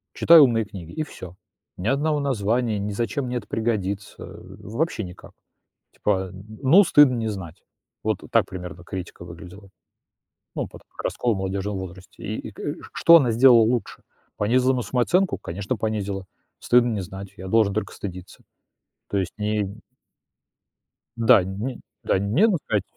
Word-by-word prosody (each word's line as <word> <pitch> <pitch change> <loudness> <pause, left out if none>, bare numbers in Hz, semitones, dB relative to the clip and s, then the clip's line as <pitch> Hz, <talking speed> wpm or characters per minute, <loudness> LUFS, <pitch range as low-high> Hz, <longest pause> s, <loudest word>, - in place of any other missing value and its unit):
Читай 170 0 +7
умные 120 -6 +5
книги 90 -5 -10
и 155 - -3
всё, 90 - -10 0.4
ни 90 - -4
одного 145 +3 +1
названия, 115 -3 0
ни 100 +1 -3
зачем 115 +6 -2
мне 125 0 -2
это 105 -4 -7
пригодится, 105 -4 -2
э, 95 +1 -12
вообще 115 +3 -2
никак, 90 -1 -11 0.6
типа, 95 -2 0
а, - - -11
м: 95 +2 -12 0.2
ну, 160 +9 +7
стыдно 145 -7 +6
не 115 -2 -2
знать. 90 -6 -8 0.4
Вот - - 0
так - - +4
примерно 90 -1 -8
критика 90 -1 -7
выглядела, 90 +3 -12 0.9
ну - - -2
под, - - -14
как - - -10
раскол 120 -4 0
в - - -4
молодёжном 95 +1 -3
возрасте, 95 0 -10
и 110 +2 -3
и - - -14
к 105 - -16
э, 145 - -3 0.2
что 170 0 +7
она 130 -7 +2
сделала 120 0 +7
лучше? 120 +2 -1 0.3
Понизила 125 +5 +2
на 125 - -1
самооценку? 170 +11 +1
Конечно, 100 +7 -4
понизила, 100 -3 -3 0.3
стыдно 120 0 +3
не 105 - -2
знать, 95 +2 -8
я 95 - -8
должен 105 0 +3
только 110 - -3
стыдиться. 90 -2 -9 0.7
То 100 - -1
есть 95 -2 -2
не 105 0 0
и 100 +2 -7 1.4
Да, 115 -3 +5
не 105 +8 -5 0.2
да, - - +1
нет 115 - +3
бы 185 - +1
сказать, 105 -3 0
105 Hz, 170 wpm, -24 LUFS, 95-125 Hz, 1.4 s, Читай